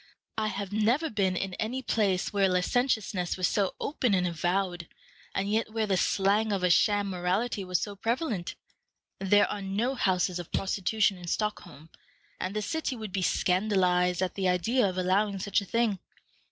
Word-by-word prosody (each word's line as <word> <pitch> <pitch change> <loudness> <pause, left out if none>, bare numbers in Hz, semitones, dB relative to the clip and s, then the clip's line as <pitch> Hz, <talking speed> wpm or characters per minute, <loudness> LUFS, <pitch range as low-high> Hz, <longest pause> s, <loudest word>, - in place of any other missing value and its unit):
I 215 -1 0
have 200 -1 -4
never 240 +9 +1
been 195 -4 +1
in 190 +1 -3
any 250 +4 -2
place 200 -4 0
where 195 -1 +3
licentiousness 190 -1 0
was 185 - +2
so 200 -3 0
open 250 -8 0
and 180 -1 +1
avowed, 175 +1 -1 0.5
and 195 +1 0
yet 215 +1 0
where 220 0 0
the 200 -2 +1
slang 200 +4 +2
of 195 -2 -1
a 180 - +4
sham 205 +2 +3
morality 190 +5 -1
was 180 -1 0
so 205 -1 -4
prevalent. 225 - -2 0.6
There 205 +2 +4
are 205 - -4
no 205 +7 -1
houses 185 -6 0
of 175 - -8
prostitution 195 0 0
in 175 - -9
Stockholm, 170 -6 -4 0.5
and 185 +2 -3
the 215 - -1
city 305 +4 -2
would 215 -4 -7
be 190 0 -2
scandalized 180 -1 +2
at 185 - -2
the 190 -2 0
idea 205 +7 +2
of 185 - -6
allowing 195 +2 +1
such 200 +1 0
a - - -7
thing. 225 -2 0
195 Hz, 175 wpm, -28 LUFS, 180-215 Hz, 0.6 s, a